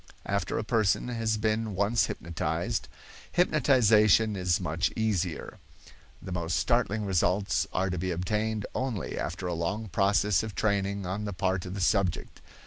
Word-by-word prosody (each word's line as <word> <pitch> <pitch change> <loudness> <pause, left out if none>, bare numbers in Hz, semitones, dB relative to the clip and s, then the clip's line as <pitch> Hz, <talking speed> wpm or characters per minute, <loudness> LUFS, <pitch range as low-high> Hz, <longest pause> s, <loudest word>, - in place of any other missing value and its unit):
After 100 -3 -1
a - - -1
person 110 +1 +1
has 115 -2 -1
been 110 -1 -1
once 100 +5 +2
hypnotized, 85 -1 -3 0.5
hypnotization 110 - +4
is 90 -2 +1
much 80 +4 -1
easier. 95 -6 -2 0.6
The - - -8
most 85 -1 -1
startling 110 -3 +1
results 95 -1 +1
are 95 0 0
to 90 - -2
be 95 +2 -2
obtained 105 +5 -1
only 130 -6 -3
after 90 +3 -4
a 90 - -1
long 90 +6 -3
process 100 0 +2
of 110 -3 -6
training 100 -1 0
on 95 +4 -3
the 100 - -4
part 95 0 -1
of 90 - -6
the 100 - -4
subject. 95 -1 0
100 Hz, 150 wpm, -28 LUFS, 90-110 Hz, 0.6 s, hypnotization